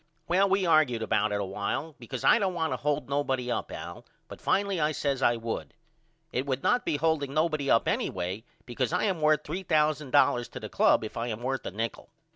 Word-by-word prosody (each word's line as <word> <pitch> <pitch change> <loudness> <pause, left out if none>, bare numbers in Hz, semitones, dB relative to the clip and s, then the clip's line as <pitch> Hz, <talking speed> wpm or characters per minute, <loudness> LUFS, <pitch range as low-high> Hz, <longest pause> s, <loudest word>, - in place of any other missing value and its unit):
Well 190 +3 +3
we 195 0 +2
argude 155 -9 +3
about 105 -1 +1
it 100 - 0
a 100 - -1
while 100 +11 -3
because 120 -3 -6
I - - +6
don't 190 -4 0
want 160 -2 -1
to - - -2
hold 150 0 -1
nobody 135 -3 -1
up - - -3
Al - - -7 0.2
but - - -11
finally 200 -2 +1
I 155 0 +1
says 140 -2 -1
I 120 - +4
would. 115 0 -5 0.6
It 130 -1 -2
would 135 -1 -2
not 245 0 +2
be 150 - 0
holding 145 -3 0
nobody 155 -3 +1
up 115 - +3
anyway 95 +4 -2 0.2
because 125 +2 -2
I 180 - 0
am 190 -6 0
worth 150 0 +3
$3000 150 -7 +1
to - - -8
the - - -7
club - - +3
if 110 - -7
I 115 +1 -2
am 115 0 -5
worth 135 +1 -2
a - - -4
nichol. 110 +3 -4
140 Hz, 215 wpm, -28 LUFS, 120-160 Hz, 0.6 s, I